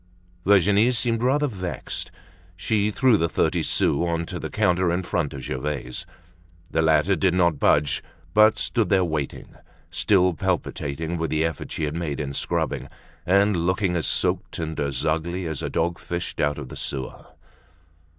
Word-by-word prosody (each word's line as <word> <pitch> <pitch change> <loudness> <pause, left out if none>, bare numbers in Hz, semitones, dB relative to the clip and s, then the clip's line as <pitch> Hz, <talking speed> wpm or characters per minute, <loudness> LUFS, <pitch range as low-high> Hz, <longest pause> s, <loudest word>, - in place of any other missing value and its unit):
Virginie 100 +3 +5
seemed 120 -2 +1
rather 140 +4 +2
vexed. 95 -9 -5 0.5
She 105 +3 0
threw 120 +1 +3
the 85 -2 0
thirty - - +1
sous 70 - +1
on 85 0 -1
to - - -6
the - - -5
counter 90 -4 +2
in 90 +2 -1
front 85 -4 -1
of 70 -1 -7
Gervaise. 65 -2 -4 0.6
The 80 - +2
latter 80 +4 +3
did 95 -2 +2
not 85 -5 +2
budge 75 0 +3 0.3
but 110 +1 +6
stood 115 -3 0
there 95 -2 +3
waiting, 75 -4 -4 0.4
still 90 -3 +3
palpitating 80 +2 -2
with 80 - -1
the 80 +1 +1
effort 80 - -4
she - - -3
had 75 +1 -2
made 85 -4 -3
in 70 -2 -3
scrubbing, - - -2 0.4
and 100 +2 +4
looking 90 +2 0
as 80 - 0
soaked - - 0
and 80 -1 -4
as 70 +1 -1
ugly 85 +3 -1
as 80 -3 -3
a - - -3
dog 85 +1 -1
fished 85 0 -5
out 75 0 +1
of 70 -4 -7
the - - -8
sewer. 65 -2 -5
85 Hz, 170 wpm, -24 LUFS, 75-100 Hz, 0.6 s, but